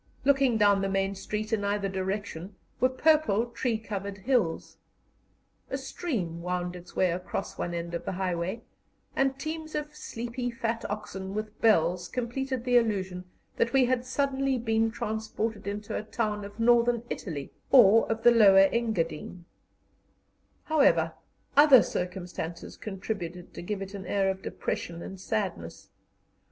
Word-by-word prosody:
Looking 270 Hz, -4 st, +4 dB
down 205 Hz, -2 st, +4 dB
the 195 Hz, -, 0 dB
main 195 Hz, 0 st, 0 dB
street, 210 Hz, +3 st, -4 dB
in 210 Hz, -2 st, +1 dB
either 200 Hz, 0 st, 0 dB
direction, 190 Hz, -1 st, -4 dB, 0.2 s
were 255 Hz, -, +4 dB
purple, 275 Hz, -5 st, +3 dB
tree 235 Hz, -1 st, -1 dB
covered 200 Hz, -2 st, -5 dB
hills. 210 Hz, -6 st, 0 dB, 0.9 s
A 270 Hz, -, -2 dB
stream 235 Hz, -, -3 dB
wound 180 Hz, 0 st, -2 dB
its 180 Hz, 0 st, -12 dB
way 185 Hz, -2 st, +3 dB
across 180 Hz, +2 st, -4 dB
one 175 Hz, 0 st, -2 dB
end 170 Hz, 0 st, -4 dB
of 170 Hz, -, -4 dB
the -, -, -2 dB
highway, 185 Hz, +3 st, -2 dB, 0.5 s
and 270 Hz, 0 st, +1 dB
teams 315 Hz, +2 st, -5 dB
of 300 Hz, 0 st, -4 dB
sleepy 245 Hz, -2 st, -4 dB
fat 235 Hz, -1 st, -2 dB
oxen 195 Hz, -2 st, -5 dB
with 215 Hz, 0 st, -5 dB
bells 180 Hz, -5 st, +3 dB
completed 255 Hz, +1 st, -3 dB
the 245 Hz, -1 st, +4 dB
illusion 190 Hz, -6 st, 0 dB, 0.3 s
that 235 Hz, -, +1 dB
we 265 Hz, -2 st, +5 dB
had 250 Hz, 0 st, +1 dB
suddenly 270 Hz, 0 st, 0 dB
been 225 Hz, -1 st, +1 dB
transported 220 Hz, 0 st, -3 dB
into 205 Hz, +1 st, -4 dB
a -, -, -1 dB
town 215 Hz, -1 st, -2 dB
of 205 Hz, +2 st, -11 dB
Northern 235 Hz, 0 st, +4 dB
Italy 145 Hz, -7 st, -5 dB, 0.2 s
or 225 Hz, -4 st, +7 dB
of 225 Hz, 0 st, -2 dB
the 240 Hz, -, +8 dB
Lower 195 Hz, -4 st, +7 dB
Engadine. 180 Hz, -6 st, -2 dB, 1.2 s
However, 305 Hz, -2 st, +3 dB, 0.4 s
other 285 Hz, -4 st, +8 dB
circumstances 180 Hz, -2 st, -5 dB
contributed 185 Hz, -4 st, -6 dB
to -, -, -7 dB
give 195 Hz, +2 st, -3 dB
it 195 Hz, +1 st, -9 dB
an 195 Hz, -2 st, -7 dB
air 195 Hz, -1 st, +2 dB
of 190 Hz, 0 st, -7 dB
depression 170 Hz, -2 st, -4 dB
and 190 Hz, -, -8 dB
sadness. 190 Hz, -, -3 dB
210 Hz, 145 wpm, -28 LUFS, 190-240 Hz, 1.2 s, the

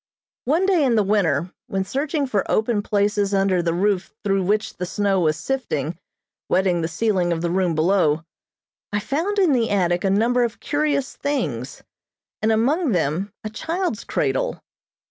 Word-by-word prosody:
One 320 Hz, +8 st, +2 dB
day 370 Hz, -5 st, +3 dB
in 250 Hz, -4 st, +3 dB
the 215 Hz, -, +4 dB
winter, 180 Hz, -5 st, +1 dB
when 195 Hz, 0 st, -1 dB
searching 285 Hz, -, -1 dB
for 210 Hz, -7 st, 0 dB
open 220 Hz, -1 st, +1 dB
places 205 Hz, -1 st, +1 dB
under 195 Hz, -2 st, +2 dB
the 170 Hz, -1 st, 0 dB
roof 195 Hz, 0 st, 0 dB
through 195 Hz, -1 st, +1 dB
which 210 Hz, +3 st, 0 dB
the 180 Hz, -, -3 dB
snow 200 Hz, 0 st, +1 dB
was 155 Hz, -3 st, +1 dB
sifting, 170 Hz, -, -2 dB, 0.5 s
wetting 180 Hz, -2 st, +2 dB
the 160 Hz, -, 0 dB
ceiling 180 Hz, 0 st, 0 dB
of 165 Hz, -1 st, -1 dB
the 170 Hz, -, 0 dB
room 180 Hz, -2 st, +1 dB
below, 160 Hz, -2 st, +2 dB, 0.7 s
I 205 Hz, -, 0 dB
found 325 Hz, -, -2 dB
in 375 Hz, -6 st, +4 dB
the 240 Hz, -4 st, +2 dB
attic 175 Hz, -3 st, +1 dB
a 195 Hz, -, +2 dB
number 235 Hz, +5 st, +3 dB
of 235 Hz, -2 st, -3 dB
curious 290 Hz, -2 st, -1 dB
things, 145 Hz, -, -3 dB, 0.6 s
and 220 Hz, +1 st, +2 dB
among 260 Hz, -, +2 dB
them 175 Hz, +4 st, 0 dB
a 215 Hz, -, -4 dB
child's 330 Hz, -, -2 dB
cradle. -, -, -1 dB
205 Hz, 165 wpm, -22 LUFS, 180-255 Hz, 0.7 s, the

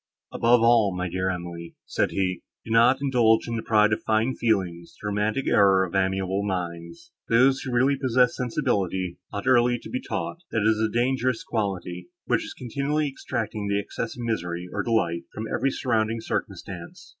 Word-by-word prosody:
"Above 120 Hz, 0 st, +4 dB
all, 115 Hz, -5 st, +4 dB
my 90 Hz, 0 st, -1 dB
dear 95 Hz, +1 st, -1 dB
Emily," 85 Hz, -2 st, -6 dB
said -, -, 0 dB
he, 90 Hz, -2 st, -1 dB, 0.2 s
"do 115 Hz, -, -7 dB
not 120 Hz, +4 st, +5 dB
indulge 120 Hz, -5 st, +3 dB
in 115 Hz, -, -2 dB
the 115 Hz, -, -2 dB
pride 105 Hz, -1 st, +3 dB
of -, -, -2 dB
fine 110 Hz, +4 st, +1 dB
feeling, 95 Hz, -9 st, 0 dB
the 85 Hz, +4 st, -15 dB
romantic 105 Hz, +5 st, 0 dB
error 95 Hz, -2 st, +5 dB
of 90 Hz, -, -10 dB
amiable 95 Hz, 0 st, 0 dB
minds. 90 Hz, -, -5 dB, 0.2 s
Those, 130 Hz, +3 st, +4 dB
who 130 Hz, -, -5 dB
really 130 Hz, +3 st, +2 dB
possess 125 Hz, -1 st, +3 dB
sensibility, 100 Hz, -, -1 dB
ought 100 Hz, -, -5 dB
early 120 Hz, -1 st, +4 dB
to -, -, -11 dB
be 255 Hz, -, -2 dB
taught, 175 Hz, -, -4 dB
that 115 Hz, -, 0 dB
it -, -, +3 dB
is 110 Hz, -, -1 dB
a 110 Hz, 0 st, +1 dB
dangerous 125 Hz, 0 st, 0 dB
quality, 90 Hz, -5 st, -3 dB, 0.2 s
which -, -, +1 dB
is -, -, -8 dB
continually 140 Hz, +4 st, -1 dB
extracting 110 Hz, -5 st, -4 dB
the 100 Hz, 0 st, +1 dB
excess 115 Hz, +3 st, -5 dB
of 120 Hz, -, -5 dB
misery, 90 Hz, -6 st, -3 dB
or 105 Hz, -, -1 dB
delight, 85 Hz, -7 st, 0 dB
from 110 Hz, -, -4 dB
every 135 Hz, -, +1 dB
surrounding 115 Hz, -4 st, 0 dB
circumstance. 95 Hz, -5 st, -6 dB
110 Hz, 180 wpm, -25 LUFS, 95-120 Hz, 0.2 s, not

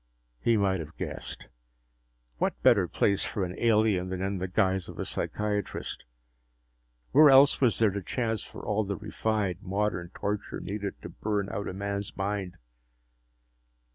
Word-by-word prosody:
He 115 Hz, -, +3 dB
might 95 Hz, -2 st, +2 dB
have 80 Hz, 0 st, -8 dB
guessed. -, -, -6 dB, 0.9 s
What -, -, 0 dB
better -, -, +5 dB
place 100 Hz, -1 st, +1 dB
for 100 Hz, -, -2 dB
an 90 Hz, -, -5 dB
alien 110 Hz, -5 st, +3 dB
than 95 Hz, -1 st, -3 dB
in 95 Hz, 0 st, -1 dB
the 95 Hz, -, -2 dB
guise 95 Hz, -1 st, +1 dB
of -, -, -9 dB
a -, -, -3 dB
psychiatrist? 105 Hz, -2 st, -3 dB, 1.1 s
Where 150 Hz, +3 st, +8 dB
else 135 Hz, +1 st, +6 dB
was 125 Hz, -4 st, +4 dB
there 110 Hz, -3 st, +4 dB
the 100 Hz, +1 st, -3 dB
chance 115 Hz, +3 st, -1 dB
for -, -, -10 dB
all 105 Hz, +1 st, +1 dB
the 100 Hz, 0 st, -3 dB
refined, 105 Hz, -3 st, -1 dB
modern 95 Hz, -2 st, -1 dB
torture 105 Hz, 0 st, -3 dB
needed 100 Hz, +1 st, -4 dB
to -, -, -6 dB
burn 105 Hz, -2 st, -2 dB
out 100 Hz, -, -3 dB
a -, -, -4 dB
man's 100 Hz, +1 st, -4 dB
mind? 95 Hz, -2 st, -2 dB
100 Hz, 155 wpm, -28 LUFS, 95-105 Hz, 1.1 s, Where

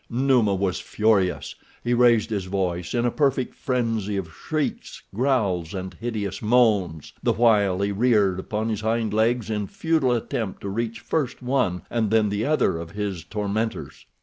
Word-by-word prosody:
Numa 120 Hz, -5 st, +2 dB
was 95 Hz, -1 st, -1 dB
furious. 105 Hz, -4 st, +1 dB, 0.3 s
He 120 Hz, -, +1 dB
raised 120 Hz, -2 st, +4 dB
his 100 Hz, -3 st, -2 dB
voice 90 Hz, 0 st, -2 dB
in 120 Hz, 0 st, +1 dB
a 120 Hz, -, +2 dB
perfect 135 Hz, -3 st, 0 dB
frenzy 115 Hz, -6 st, -1 dB
of 85 Hz, -5 st, -5 dB
shrieks, 155 Hz, -, -4 dB
growls, 100 Hz, -, 0 dB
and 95 Hz, 0 st, -5 dB
hideous 110 Hz, -5 st, -4 dB
moans, 105 Hz, -9 st, +2 dB
the -, -, +2 dB
while 105 Hz, -5 st, +3 dB
he 100 Hz, 0 st, 0 dB
reared 100 Hz, -4 st, +2 dB
upon 110 Hz, +3 st, -2 dB
his 110 Hz, -2 st, -2 dB
hind 110 Hz, -1 st, 0 dB
legs 110 Hz, +1 st, +1 dB
in 105 Hz, -2 st, -2 dB
futile 155 Hz, -, +1 dB
attempt 115 Hz, -3 st, -3 dB
to 100 Hz, -, -4 dB
reach 115 Hz, +3 st, -3 dB
first 135 Hz, -5 st, -2 dB
one 125 Hz, -9 st, 0 dB
and 115 Hz, -3 st, 0 dB
then 110 Hz, -1 st, +3 dB
the 105 Hz, +2 st, -1 dB
other 145 Hz, -, +2 dB
of 85 Hz, 0 st, -7 dB
his 100 Hz, -3 st, -4 dB
tormentors. 105 Hz, +4 st, -3 dB
110 Hz, 165 wpm, -24 LUFS, 100-120 Hz, 0.3 s, raised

